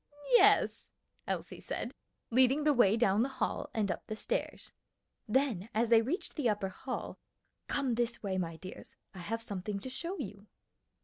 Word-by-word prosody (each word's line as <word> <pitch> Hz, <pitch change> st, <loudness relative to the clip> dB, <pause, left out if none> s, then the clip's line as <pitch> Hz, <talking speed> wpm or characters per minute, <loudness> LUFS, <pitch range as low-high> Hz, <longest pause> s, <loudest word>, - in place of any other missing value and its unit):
"Yes," 485 Hz, -, +5 dB, 0.4 s
Elsie -, -, -4 dB
said, -, -, -4 dB, 0.4 s
leading 260 Hz, +4 st, +4 dB
the 300 Hz, 0 st, +4 dB
way 225 Hz, -4 st, +5 dB
down 210 Hz, -2 st, +3 dB
the 260 Hz, -, +1 dB
hall 270 Hz, -, -2 dB
and 215 Hz, -6 st, 0 dB
up -, -, -6 dB
the 215 Hz, -, -3 dB
stairs. -, -, -3 dB, 0.5 s
Then 225 Hz, -4 st, +1 dB
as 225 Hz, +1 st, +2 dB
they 230 Hz, -1 st, +7 dB
reached 275 Hz, +11 st, -3 dB
the 280 Hz, -7 st, +1 dB
upper 200 Hz, -2 st, 0 dB
hall, 255 Hz, +7 st, -5 dB, 0.5 s
"Come 270 Hz, -4 st, 0 dB
this 235 Hz, 0 st, -1 dB
way, 190 Hz, -2 st, -1 dB
my 165 Hz, -2 st, -3 dB
dears, 185 Hz, +3 st, -10 dB, 0.2 s
I 190 Hz, -, -9 dB
have 225 Hz, +6 st, -3 dB
something 200 Hz, 0 st, -3 dB
to 260 Hz, +6 st, -7 dB
show 340 Hz, +8 st, -3 dB
you." 205 Hz, -, -7 dB
225 Hz, 170 wpm, -32 LUFS, 200-260 Hz, 0.5 s, they